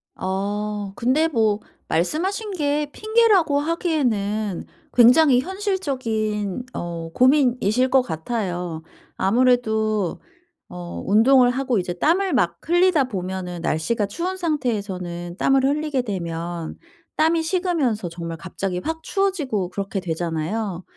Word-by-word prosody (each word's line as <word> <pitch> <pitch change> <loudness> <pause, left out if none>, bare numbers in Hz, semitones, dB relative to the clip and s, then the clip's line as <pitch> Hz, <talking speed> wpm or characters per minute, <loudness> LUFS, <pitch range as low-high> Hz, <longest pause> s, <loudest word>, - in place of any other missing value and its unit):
어. 205 +1 -3
근데 270 +7 +2
뭐 220 -7 +1 0.3
말씀하신 375 - -1
게 295 -3 0
핑계라고 425 -10 +3
하기에는 225 - -1 0.3
굉장히 250 +2 +6
현실적인 255 - -2
어 170 -1 -5
고민이실 255 -3 +3
것 265 0 +5
같아요. 175 -4 -3 0.3
아무래도 220 -3 +1 0.5
어 175 -1 -7
운동을 245 +4 +5
하고 255 -4 0
이제 175 0 -3
땀을 355 - +1
막 - - +1
흘리다 350 -4 +4
보면은 185 -4 -5
날씨가 200 +8 0
추운 360 - -3
상태에서는 200 - -3
땀을 270 -1 +3
흘리게 295 -1 0
되면 170 -5 -4 0.4
땀이 320 +1 +3
식으면서 320 - 0
정말 170 -1 -6
갑자기 180 +1 -4
확 320 0 -4
추워지고 300 - -1
그렇게 195 +1 -3
되잖아요. 175 +3 -3
225 Hz, 270 characters per minute, -22 LUFS, 185-300 Hz, 0.5 s, 굉장히